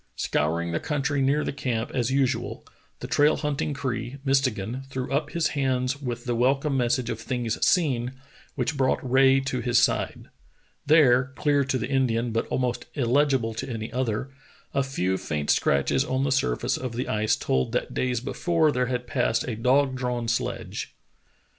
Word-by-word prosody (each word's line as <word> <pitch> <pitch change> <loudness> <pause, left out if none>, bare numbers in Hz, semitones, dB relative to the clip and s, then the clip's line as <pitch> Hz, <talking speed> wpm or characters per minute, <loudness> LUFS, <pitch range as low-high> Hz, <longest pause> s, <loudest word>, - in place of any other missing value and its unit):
Scouring 85 +3 0
the 85 - -1
country 145 -1 -1
near 140 +3 +2
the - - -3
camp 125 -4 -2
as 120 -2 0
usual, 130 -3 -1 0.4
the - - -5
trail 150 +1 +3
hunting 150 -1 -2
Cree, 125 -1 -3
Mistegan, 130 -4 0
threw 130 -1 -4
up 145 +1 0
his 170 0 0
hands 130 -1 -1
with 120 -3 -4
the 120 - 0
welcome 135 +4 +1
message 125 -1 +1
of 115 - -4
things 120 -2 -2
seen, 130 -8 +2 0.4
which 130 +4 -1
brought 130 -2 +2
Rae 135 +1 +5
to 135 -1 -2
his 120 -1 +1
side. - - 0 0.6
There, 135 -4 +5
clear 145 -1 +2
to 135 0 0
the 115 - -3
Indian 125 -3 +1
but 115 +1 -1
almost 125 -2 -1
illegible 130 -3 +2
to 110 - -5
any 115 -1 -5
other, 125 0 -2 0.4
a 140 - +2
few 95 -9 -1
faint 75 -2 -1
scratches 70 -1 +2
on 130 +1 -1
the 140 - 0
surface 95 - 0
of 130 -2 -5
the 125 +3 -3
ice 110 0 +1
told 65 -1 0
that - - -1
days 125 -2 -1
before 160 +3 +1
there 125 -2 0
had 125 -1 -2
passed 120 -3 0
a 120 - -2
dog 130 +4 +2
drawn 125 -2 -2
sledge. 115 -4 -3
130 Hz, 170 wpm, -26 LUFS, 115-135 Hz, 0.6 s, Rae